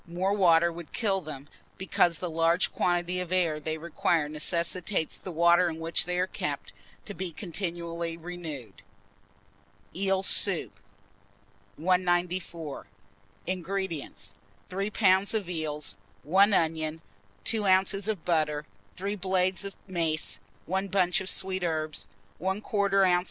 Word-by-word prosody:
More 180 +4 0
water 170 -4 +5
would 170 -1 -9
kill 195 -5 +1
them, 150 -3 -8 0.3
because 175 -3 +2
the 180 - -3
large 165 +2 +2
quantity 175 0 +1
of 180 -1 -4
air 170 -5 +2
they 155 +1 -3
require 165 -1 +1
necessitates 170 +3 -1
the 185 - -7
water 170 +2 +5
in 160 - -5
which 165 +1 0
they 180 +1 -2
are 180 - +3
kept, - - -4 0.3
to 205 - -6
be 185 -2 -3
continually 170 -2 -3
renewed. 160 - -7 1.1
EEL 190 +1 +1
SOUP. 190 -2 +1 1.0
194. 175 - 0 0.6
INGREDIENTS. 175 - -3 0.4
3 195 +2 -1
lbs. 200 -1 +3
of 205 -5 -1
eels, 150 - -2 0.3
1 195 +7 +5
onion, 160 -3 +1 0.4
2 215 -3 +1
oz. 195 +2 +4
of 210 -6 -2
butter, 155 -3 +1 0.3
3 200 +2 -2
blades 185 -1 +1
of 200 - -6
mace, 165 -4 0 0.3
1 190 +2 -1
bunch 185 -1 +2
of 190 - -3
sweet 190 0 +1
herbs, 155 -2 -1 0.3
1/4 195 +1 +2
oz. 180 -1 +5
175 Hz, 130 wpm, -28 LUFS, 165-190 Hz, 1.1 s, water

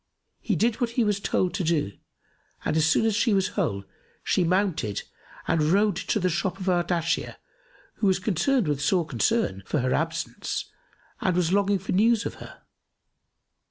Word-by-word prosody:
He 215 - -1
did 225 +8 +1
what 240 - +1
he 240 - +4
was 210 -2 +1
told 185 -2 0
to 190 - -2
do 155 - 0 0.7
and - - 0
as 160 0 +3
soon 190 - +3
as 220 -2 +2
she 215 0 +2
was 190 -1 +1
whole 100 -3 -2 0.4
she 185 - +2
mounted 175 - 0 0.4
and 165 -1 +2
rode 200 +7 +3
to - - -1
the 185 - +1
shop 185 +2 -1
of 190 - -6
Ardashir 175 -2 0 0.6
who 205 - +1
was 190 -1 +3
concerned 210 - +1
with 145 -1 -1
sore 175 +3 +2
concern 120 - 0
for - - 0
her 130 +1 0
absence 165 +1 -3 0.5
and 185 -2 0
was 180 0 +1
longing 200 0 +3
for 190 - -5
news 225 +3 +3
of - - -3
her. - - -12
185 Hz, 175 wpm, -26 LUFS, 160-205 Hz, 0.7 s, he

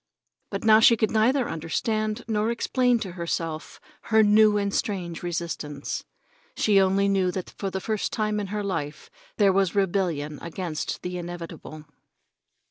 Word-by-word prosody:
But - - -4
now 220 -1 +7
she 230 +1 +6
could 220 - +1
neither 240 +4 +2
understand 215 +7 -2
nor 215 0 0
explain 245 +1 +2
to 190 - -4
herself 165 -2 -4 0.3
her 220 -1 +5
new 210 0 +5
and 200 -1 -1
strange 180 -5 -2
resistance. 165 -4 -4 0.5
She 200 -2 +4
only 195 +1 +2
knew 195 -2 +2
that 180 0 -5
for 195 - -4
the 190 - -3
first 215 +2 -2
time 215 -1 -1
in 205 - -3
her 210 +1 -3
life 155 -6 -4 0.3
there 200 -3 +4
was 195 -1 +1
rebellion 170 -7 0
against 170 -2 -4
the 180 0 -4
inevitable. 170 -3 -8
195 Hz, 150 wpm, -25 LUFS, 170-215 Hz, 0.5 s, now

